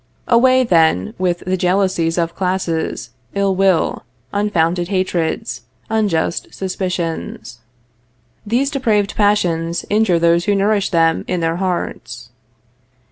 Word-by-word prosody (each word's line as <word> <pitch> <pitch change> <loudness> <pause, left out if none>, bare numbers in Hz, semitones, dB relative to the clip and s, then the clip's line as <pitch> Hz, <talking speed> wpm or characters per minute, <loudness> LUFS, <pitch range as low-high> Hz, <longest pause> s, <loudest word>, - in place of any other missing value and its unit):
Away, 255 +2 +4
then, 160 - +2
with 175 -2 -1
the 185 +1 0
jealousies 180 -2 +1
of 170 -1 0
classes, 180 -8 -2 0.2
ill 200 -1 +1
will, 190 -2 +1 0.3
unfounded 175 -4 0
hatreds, 185 +1 -2 0.3
unjust 200 -7 0
suspicions. 175 - -4 0.8
These 245 +7 0
depraved 220 -8 0
passions 170 -5 +1
injure 210 -4 +3
those 170 +1 +2
who 205 - +2
nourish 200 0 +1
them 165 -2 +2
in 180 - -1
their 165 +1 0
hearts. 125 -10 -4
185 Hz, 110 wpm, -18 LUFS, 165-205 Hz, 0.8 s, Away